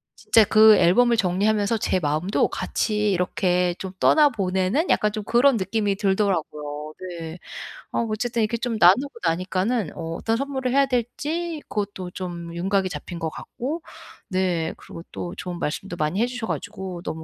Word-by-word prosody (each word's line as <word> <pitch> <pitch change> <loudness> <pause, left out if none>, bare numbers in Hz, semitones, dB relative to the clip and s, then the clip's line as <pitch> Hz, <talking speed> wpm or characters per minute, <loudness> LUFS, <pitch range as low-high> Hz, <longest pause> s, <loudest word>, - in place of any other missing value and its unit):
진짜 225 - +4
그 215 0 +7
앨범을 235 +7 +4
정리하면서 205 +3 +1
제 185 - +1
마음도 155 +5 +1
같이 210 -2 -1
이렇게 180 -1 +1
좀 190 - -5
떠나보내는 215 - +3
약간 210 0 +3
좀 215 0 -4
그런 245 +2 +4
느낌이 200 +1 0
들더라고요. 190 -7 0 0.5
네. 165 +1 -6 0.6
어 - - +1
어쨌든 230 +1 -1
이렇게 225 +2 0
좀 235 -1 -2
나누고 235 +11 +5
나니까는 185 +4 0
어 165 -1 -5
어떤 225 +6 -1
선물을 265 -2 -2
해야 275 0 +5
될지 295 +7 -2
그것도 200 -3 -4
좀 170 -2 -6
윤곽이 190 +2 0
잡힌 175 -1 -7
것 160 - -2
같고 270 - -5 0.5
네 180 -4 0
그리고 165 - -11
또 175 - -5
좋은 180 -1 -5
말씀도 175 +4 -3
많이 155 +8 0
해 240 - +3
주셔 245 -2 -5
가지고 190 -4 -5
너무 160 -2 -5
200 Hz, 340 characters per minute, -24 LUFS, 180-235 Hz, 0.6 s, 그